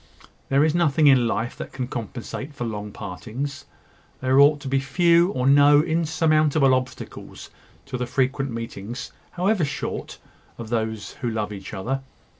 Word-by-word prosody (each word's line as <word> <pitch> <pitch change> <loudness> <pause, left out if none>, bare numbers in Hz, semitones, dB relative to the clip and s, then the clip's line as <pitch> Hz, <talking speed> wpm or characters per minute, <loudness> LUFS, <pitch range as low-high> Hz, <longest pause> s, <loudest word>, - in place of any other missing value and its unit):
There 140 +2 +4
is 155 - +1
nothing 160 -3 +2
in 130 -4 +6
life 115 +1 -2
that - - -7
can 130 -2 -4
compensate 125 +4 -6
for 125 - -4
long 105 -2 -5
partings. 115 - -6 0.5
There 130 +1 +3
ought 145 +1 +6
to 140 - -7
be 135 +1 +1
few 170 +5 +3
or 125 - -1
no 145 +2 +6
insurmountable 155 -3 +2
obstacles 130 -1 -5 0.3
to 135 -3 -5
the 125 - -2
frequent 135 +2 0
meetings, 115 0 -6 0.2
however 185 +1 +1
short, 140 - -4 0.4
of 115 -2 -7
those 110 -4 -2
who 120 - -1
love 105 -2 -3
each 95 -1 -8
other. 130 +8 -3
135 Hz, 155 wpm, -24 LUFS, 115-145 Hz, 0.5 s, in